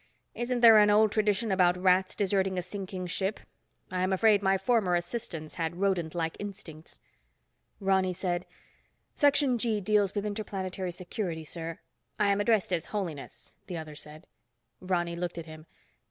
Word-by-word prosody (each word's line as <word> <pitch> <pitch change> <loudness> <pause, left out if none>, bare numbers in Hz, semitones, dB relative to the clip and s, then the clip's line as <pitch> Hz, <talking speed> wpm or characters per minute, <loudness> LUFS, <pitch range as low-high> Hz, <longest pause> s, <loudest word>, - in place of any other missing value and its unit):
Isn't 240 0 -2
there 225 -2 +9
an 210 0 +5
old 210 0 +5
tradition 210 0 +1
about 180 -2 +3
rats 185 0 +2
deserting 195 -1 0
a 180 - -1
sinking 185 0 -6
ship? 190 +4 -2 0.5
I 185 0 -1
am 185 +1 +1
afraid 205 +1 +4
my 195 0 +3
former 195 -3 +2
assistants 175 -4 -4
had 165 +1 -1
rodentlike 175 -4 -1
instincts." 185 -6 -9 0.8
Ronny 190 -2 +2
said, 180 -1 -3 0.7
"Section 285 -4 +3
G 220 -2 0
deals 205 0 +1
with 205 0 -1
Interplanetary 195 -3 -4
Security, 175 -1 -4
sir—" 165 +2 -6 0.4
"I 205 -1 +3
am 200 +1 +1
addressed 205 -3 +2
as 170 - -1
Holiness," 175 -9 -6
the 180 -3 -5
other 155 -1 -7
said. 150 +2 -11 0.5
Ronny 175 -2 -1
looked 175 0 -4
at 165 - -5
him. 155 0 -12
190 Hz, 155 wpm, -29 LUFS, 175-205 Hz, 0.8 s, there